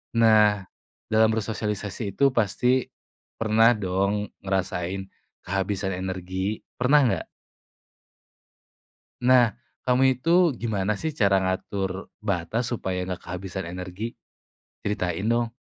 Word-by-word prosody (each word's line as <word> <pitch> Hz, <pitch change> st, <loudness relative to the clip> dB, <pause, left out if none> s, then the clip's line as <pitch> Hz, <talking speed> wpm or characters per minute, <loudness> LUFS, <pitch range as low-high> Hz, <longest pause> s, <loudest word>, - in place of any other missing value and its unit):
Nah, 105 Hz, -3 st, +5 dB, 0.5 s
dalam 110 Hz, 0 st, +5 dB
bersosialisasi 105 Hz, -2 st, -3 dB
itu 140 Hz, -1 st, +4 dB
pasti 125 Hz, +3 st, +1 dB, 0.5 s
pernah 115 Hz, +2 st, +4 dB
dong 100 Hz, +1 st, -1 dB
ngerasain 95 Hz, -1 st, -2 dB, 0.4 s
kehabisan 95 Hz, 0 st, -2 dB
energi. 95 Hz, +2 st, -3 dB, 0.2 s
Pernah 140 Hz, +4 st, +5 dB
nggak? -, -, -3 dB, 2.0 s
Nah, 125 Hz, -4 st, +5 dB, 0.3 s
kamu 125 Hz, +1 st, +4 dB, 0.2 s
itu 165 Hz, +5 st, +1 dB, 0.3 s
gimana 105 Hz, -3 st, 0 dB
sih 160 Hz, -, -1 dB
cara 100 Hz, -6 st, +4 dB
ngatur 95 Hz, 0 st, -3 dB
batas 105 Hz, +4 st, -1 dB
supaya 95 Hz, -6 st, -2 dB
nggak 90 Hz, -1 st, -4 dB
kehabisan 95 Hz, +1 st, -5 dB
energi? 90 Hz, +5 st, -5 dB, 0.7 s
Ceritain 95 Hz, -1 st, -2 dB
dong! 120 Hz, 0 st, +1 dB
100 Hz, 100 wpm, -25 LUFS, 95-115 Hz, 2.0 s, Nah